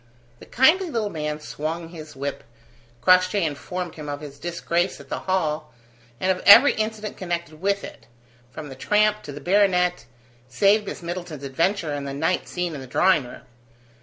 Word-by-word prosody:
The - - -14
kindly 330 +9 +4
little 220 -7 -2
man 150 -1 -3
swung 160 +2 -5
his 155 -3 -10
whip. 140 +1 -4 0.6
Crossjay 185 +1 +4
informed 175 +4 -4
him 150 -2 -8
of 145 0 -4
his 140 -2 -10
disgrace 170 +2 -1
at 140 -1 -14
the - - -3
Hall, 155 -5 -1 0.5
and 185 - +2
of 185 - -3
every 280 +8 +9
incident 215 -1 -3
connected 170 -3 -4
with 200 +1 0
it, - - -11 0.4
from 150 +3 -9
the 135 - -9
tramp 210 +8 +2
to 145 - -8
the 145 - -8
baronet, 180 0 +2 0.4
save 205 - +3
Miss - - -6
Middleton's 170 -4 -6
adventure 165 +4 0
and 140 -1 -4
the 135 - -5
night 165 +5 0
scene 180 -2 -3
in 140 - -6
the 130 - -9
drawing 170 0 +3
room. 120 - -11
175 Hz, 175 wpm, -23 LUFS, 150-195 Hz, 0.6 s, every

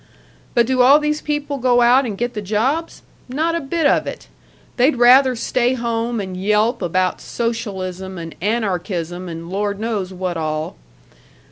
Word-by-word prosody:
But 235 - +4
do 255 +1 +2
all 270 +4 +7
these 300 0 -1
people 295 -1 -3
go 245 -1 +3
out 250 +2 +5
and 205 -3 -5
get 240 +2 -2
the 210 - -4
jobs? 245 - -1 0.3
Not 315 +6 0
a 335 - 0
bit 315 +3 -1
of - - +3
it! - - -7 0.5
They'd 260 +4 +3
rather 255 +2 +6
stay 245 +2 0
home 235 -1 -2
and 190 -2 -5
yelp 210 +5 +1
about 185 +1 0
socialism 190 -5 -4
and 165 -1 -7
anarchism 180 -4 -2
and 165 0 -7
Lord 205 +1 -2
knows 210 -4 -2
what 180 -2 -3
all. 155 -1 -3
230 Hz, 160 wpm, -19 LUFS, 185-255 Hz, 0.5 s, all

